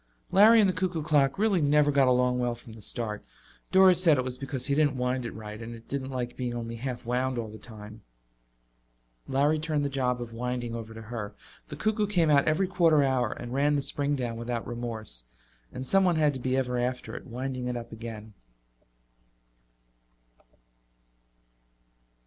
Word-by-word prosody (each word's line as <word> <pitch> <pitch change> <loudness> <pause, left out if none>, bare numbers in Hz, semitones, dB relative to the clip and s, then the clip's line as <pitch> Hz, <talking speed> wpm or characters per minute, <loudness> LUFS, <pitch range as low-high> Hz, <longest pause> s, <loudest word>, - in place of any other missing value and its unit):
Larry 220 +4 +7
and 210 - +5
the 185 - +1
cuckoo 175 -2 -2
clock 145 -2 +2
really 200 -4 +2
never 145 0 +4
got 140 -2 +4
along 125 0 +2
well 120 -1 0
from 115 -1 -12
the 110 - -12
start. 105 -1 -3 0.5
Doris 185 -1 +6
said 160 -5 +5
it 130 - +1
was 125 -1 -3
because 135 -1 -3
he 140 - +1
didn't 145 -2 +2
wind 125 0 -1
it - - -7
right, 105 0 -8
and 115 +1 -7
it 115 0 -15
didn't 135 -1 -4
like 125 -2 -4
being 125 -2 -3
only 115 -1 -5
half 125 0 -5
wound 125 +1 -1
all 115 -2 -3
the 110 - -10
time. 110 -1 -11 1.3
Larry 145 +3 +2
turned 150 -2 -1
the - - 0
job 125 -2 0
of 120 -1 -7
winding 120 0 -3
over 115 -1 -7
to 115 - -8
her; 105 -2 -6 0.3
the - - -7
cuckoo 215 -1 0
came 170 -6 +2
out 140 -1 +4
every 155 +5 +2
quarter 170 -5 +3
hour 130 -4 +1
and 120 0 -7
ran 145 +2 +2
the 140 - 0
spring 145 +1 0
down 120 -4 -3
without 115 0 -3
remorse, 115 - -4 0.5
and 130 - -6
someone 185 +3 +3
had 150 -2 +3
to 130 - -5
be 130 +1 0
ever 125 -2 0
after 125 +1 -3
it, - - -8
winding 130 +1 -4
it 125 -1 -2
up 115 0 -8
again. 110 -1 -8
130 Hz, 185 wpm, -28 LUFS, 120-145 Hz, 1.3 s, Larry